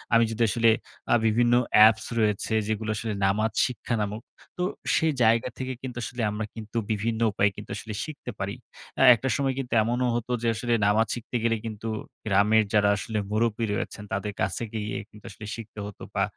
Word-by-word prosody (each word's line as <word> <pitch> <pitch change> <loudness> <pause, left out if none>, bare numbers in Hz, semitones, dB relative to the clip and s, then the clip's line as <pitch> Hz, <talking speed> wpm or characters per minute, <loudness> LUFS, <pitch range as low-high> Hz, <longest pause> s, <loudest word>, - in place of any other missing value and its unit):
আমি 115 - +6
যদি 115 +1 0
আসলে 115 +1 +3 0.4
আ - - +7
বিভিন্ন 120 +2 +3 0.2
অ্যাপস 110 0 +7
রয়েছে, 105 0 +1
যেগুলো 110 0 -2
আসলে 110 0 -3
নামাজ 110 +3 +1
শিক্ষা 125 -1 -3
নামক। 105 +2 -3 0.4
তো 180 - -1 0.3
সেই 160 -1 +3
জায়গা 115 +2 +3
থেকে 130 0 -3
কিন্তু 125 -2 -6
আসলে 120 +1 -5
আমরা 105 +1 -3
কিন্তু 110 +1 -6
বিভিন্ন 110 +1 -1
উপায়ে 100 +1 +2
কিন্তু - - -10
আসলে 110 +1 -6
শিখতে 145 -5 -7
পারি। 100 +2 -3 0.4
আ - - +2
একটা 130 +3 -3
সময় 135 -1 0
কিন্তু 125 -3 -4
এমনও 120 +3 0
হতো 120 +1 -3
যে 120 - 0
আসলে 120 +1 -1
নামাজ 110 +2 +3
শিখতে 120 +1 -8
গেলে 115 -1 +2
কিন্তু 110 0 -5 0.4
গ্রামের 105 +2 +4
যারা 105 -1 +4
আসলে 110 +1 -4
মুরব্বি 115 +1 +1
রয়েছেন 105 - -4
তাদের 100 +1 -2
কাছ - - 0 0.2
গিয়ে 105 -1 -3
কিন্তু 105 0 -16
আসলে 105 +2 -10
শিখতে 110 -2 -9
হতো 105 - -10
বা, - - +1
110 Hz, 185 wpm, -26 LUFS, 105-120 Hz, 0.4 s, আ